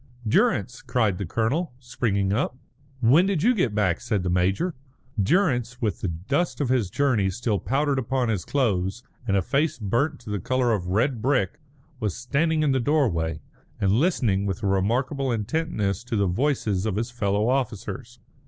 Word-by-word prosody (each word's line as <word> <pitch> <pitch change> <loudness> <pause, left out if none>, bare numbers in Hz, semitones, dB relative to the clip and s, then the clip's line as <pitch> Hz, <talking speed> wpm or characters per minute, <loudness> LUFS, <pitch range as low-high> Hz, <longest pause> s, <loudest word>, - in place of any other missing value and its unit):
"Durrance!" 105 +2 +1
cried 110 -7 0
the 100 - -3
colonel, 125 - -1
springing 100 -6 -1
up. 125 +2 -1 0.4
"When 145 +11 +5
did 190 -5 0
you 245 +3 +5
get 130 - 0
back?" 95 -5 +1
said 110 -6 -1
the 90 - 0
major. 95 - +1 0.5
Durrance, 125 - +1
with 110 -4 -2
the - - -1
dust 100 - -1
of 140 -4 0
his 125 -7 +1
journey 115 -4 +1
still 105 +1 -1
powdered 140 +1 0
upon 130 0 0
his 105 -5 -1
clothes, 110 -5 0 0.2
and 100 -2 +2
a 95 - +1
face 145 - 0
burnt 120 +8 0
to 110 -3 -8
the 105 - -1
colour 125 +4 +1
of 90 -5 -2
red 110 +6 +1
brick, 125 -8 0 0.4
was 105 -6 -2
standing 155 +5 +1
in 145 - +3
the 135 - +2
doorway, 105 - +1 0.4
and 95 -2 +2
listening 110 - +2
with 95 +2 -3
a - - +1
remarkable 125 +8 0
intentness 110 - -1
to 120 - -3
the 100 -2 +2
voices 105 -1 0
of 105 - -1
his 115 +3 -2
fellow 105 -2 0
officers. 125 -1 -2
115 Hz, 175 wpm, -25 LUFS, 100-135 Hz, 0.5 s, When